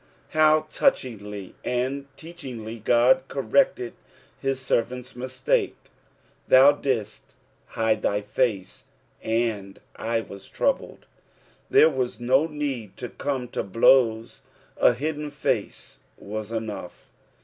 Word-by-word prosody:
How 155 0 +4
touchiogiy 105 - -1
and 130 +3 -2
teochingly 120 -10 -8
God 125 +3 +4
corrected 135 - +1 0.5
his 135 -1 -1
servant's 125 0 -2
mistake: 130 +1 -1 0.4
' - - -37
Thou 135 +2 +8
didid 115 -8 -2 0.5
hide 110 -1 0
t/it//aet, 105 -1 -1 0.4
and 110 -4 -2 0.2
I 115 0 -1
tea* 100 -3 -10
troubled." - - -1 0.6
There - - +7
wna 130 -3 -1
no 130 +6 +3
need 140 - -4
to 120 - -6
come 135 -3 -3
to - - -2
blows, 115 +2 +3 0.4
a - - +5
hidden 150 +3 -3
face 145 0 -3 0.2
whs 105 +1 -6
enough. 110 -5 -6
125 Hz, 105 wpm, -25 LUFS, 110-135 Hz, 0.6 s, Thou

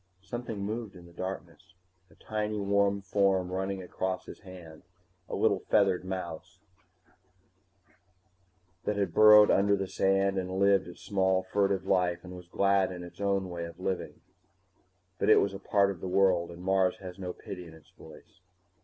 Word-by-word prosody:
_ - - -26
Something 115 -1 -5
moved 110 -1 -5
in 90 -1 -13
the 85 - -16
darkness, 95 0 -7 0.3
a - - -21
tiny 105 -1 -3
warm 100 0 +1
form 95 -2 +1
running 95 0 -3
across 95 0 -3
his - - -10
hand, 90 -5 -12 0.5
a - - -3
little - - +2
feathered 95 -4 +2
mouse 90 -1 -6 2.3
like 105 - -1
thing - - -6
that 100 -5 -1
burrowed 105 +1 +8
under 100 +1 +3
the 95 -1 -3
sand 95 +1 +1
and 95 0 -4
lived 100 -1 +3
its 90 - -12
small 95 -2 +1
fugitive 95 0 0
life 90 -3 +1
and 90 0 -9
was 90 -1 -11
glad 100 +1 +2
in 90 -1 -7
its 90 +3 -11
own 100 -1 0
way 85 -1 -5
of 85 +1 -11
living. 95 0 -4 1.0
But - - +1
it - - +7
was 100 - 0
a 95 - -7
part 100 0 +2
of 90 - -9
a 95 - -4
world, 90 -2 +2
and 85 +1 -10
Mars 95 -1 +2
has 95 -1 -10
no 90 -1 -4
pity 90 -1 -9
in 80 - -13
its 80 - -20
voice. 80 +2 -16
95 Hz, 180 wpm, -29 LUFS, 90-100 Hz, 2.3 s, burrowed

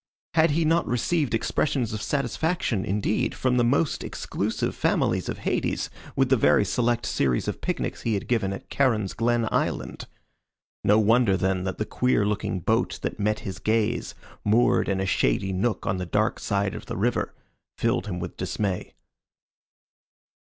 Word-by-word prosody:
Had 160 0 +4
he 160 +2 +1
not 165 +2 +2
received 125 +1 +1
expressions 120 0 0
of 105 - -3
satisfaction, 140 - -1
indeed, 105 +2 0
from 125 -1 +1
the 120 - +4
most 140 +6 +1
exclusive - - -2
families - - +1
of - - -3
Hades - - -1 0.2
with 135 -1 +2
the 135 - +5
very 110 -3 +4
select 120 +3 0
series 65 -3 0
of - - -3
picnics - - -2
he 115 -2 0
had 100 - -4
given 110 -5 +1
at 95 - -7
Charon's 110 -8 +1
Glen 115 0 +1
Island? - - -2 0.8
No 105 - +5
wonder, 110 -2 +4
then, 95 0 0
that 95 - -3
the 110 - -1
queer 125 -4 +1
looking 105 -3 -1
boat 110 +7 +1
that - - -3
met 105 +1 0
his 95 0 -6
gaze, 115 +2 0 0.3
moored 110 +2 +3
in 95 -1 0
a 95 - 0
shady 95 +2 +1
nook 105 +5 -1
on 95 - 0
the 90 -1 -4
dark 110 +5 +1
side 100 -1 0
of - - -8
the - - -4
river, - - 0 0.4
filled 100 - 0
him 90 -3 -3
with 90 0 -6
dismay. 95 -4 -3
110 Hz, 165 wpm, -25 LUFS, 95-125 Hz, 0.8 s, the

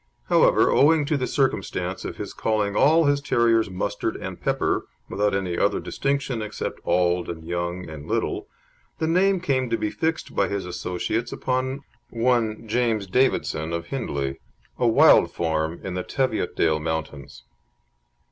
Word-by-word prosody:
However, - - +4
owing 150 +1 +4
to 150 - 0
the 130 -3 -1
circumstance 135 -2 -1
of - - -5
his - - -6
calling 105 -2 0
all 160 +3 +5
his 145 0 +2
terriers 115 -5 +2
Mustard 90 0 -2
and - - -7
Pepper, - - 0 0.2
without 105 0 0
any 90 -3 -2
other - - +2
distinction 135 -4 -2
except 110 - -5
"auld" 90 -1 +1
and 80 -2 -7
"young" 85 +1 -3
and 80 -2 -9
"little," - - -2 0.5
the 160 - -1
name 185 +4 +3
came 130 -7 0
to 115 - +1
be 105 -1 -2
fixed 160 0 -2
by - - +2
his 100 -2 -3
associates 90 +6 -3
upon 130 +2 -2 0.3
one 115 -2 0
James 115 -2 0
Davidson, 90 -7 0
of 85 0 -4
Hindlee, 70 - -3 0.4
a 120 - +3
wild 115 - +6
farm 80 0 -1
in 95 - -4
the 90 - -2
Teviotdale 90 - 0
mountains. 80 -3 -5
110 Hz, 150 wpm, -24 LUFS, 85-130 Hz, 0.5 s, wild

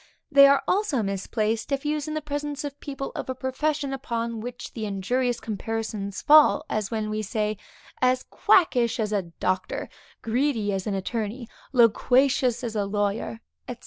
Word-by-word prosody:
They 280 0 +9
are 280 0 +4
also 365 - +1
misplaced, 215 +4 -2
if 275 +1 -1
used 300 0 -1
in 310 - -3
the 310 - -3
presence 290 0 -4
of 285 -1 -6
people 275 -1 -5
of - - -5
a 260 - -2
profession 280 +2 -1
upon 235 -4 -3
which 245 +2 -7
the 220 -2 -4
injurious 240 +5 -1
comparisons 215 -2 -4
fall, 305 0 +6
as 210 -2 -1
when 215 -1 -2
we 215 0 -1
say; 215 0 -1 0.5
As 255 0 +3
quackish 250 -10 +2
as 215 -1 -1
a 205 -2 +1
doctor; 185 +2 -3 0.3
greedy 230 -3 0
as 190 0 -3
an 205 - -1
attorney; 220 +4 -3 0.2
loquacious 250 +1 +3
as 230 -2 -4
a 205 -1 0
lawyer, 205 +2 -2 0.3
&c. 245 - -5
235 Hz, 165 wpm, -25 LUFS, 215-275 Hz, 0.5 s, They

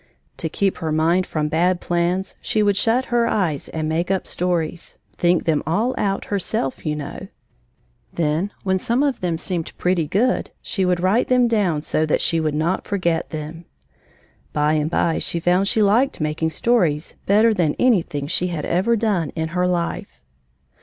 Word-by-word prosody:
To 160 - -3
keep 195 +4 0
her 160 -3 -3
mind 165 +4 +2
from 150 -1 -1
bad 175 +3 +1
plans 175 +3 -1
she 215 - +1
would 205 -1 +3
shut 230 +5 +2
her 235 -1 +3
eyes 175 -11 -1
and 155 -1 -3
make 165 +3 -1
up 195 -1 0
stories 175 -2 -2 0.2
think 175 -1 +2
them 155 -3 +2
all 215 +10 +1
out, 195 -1 -1
herself, 195 -8 -2
you 150 - 0
know. 150 -2 -7 0.8
Then, 165 +5 -1
when 190 -1 +1
some 240 +8 +1
of 280 -3 -1
them 175 -3 -1
seemed 170 -1 -3
pretty 180 -3 +1
good, 235 - +1
she 190 -3 -1
would 180 -1 +1
write 195 +7 +2
them 250 -1 +4
down 190 -10 +1
so 155 0 0
that - - +2
she 165 - +1
would 155 -2 -1
not 165 +5 -1
forget 175 -5 -1
them. 160 +2 -7 0.9
By 150 0 +2
and 155 0 0
by 165 -1 +1
she 170 - -1
found 180 +3 +2
she 215 +1 +2
liked 230 +7 +2
making 155 +1 -1
stories 165 -5 +1
better 215 +3 +5
than 170 -7 +1
anything 175 - +1
she 180 +4 0
had 170 -4 -3
ever 190 +7 +2
done 205 -8 0
in 160 0 -2
her 180 +2 0
life. 175 -2 -3
175 Hz, 180 wpm, -21 LUFS, 160-200 Hz, 0.9 s, better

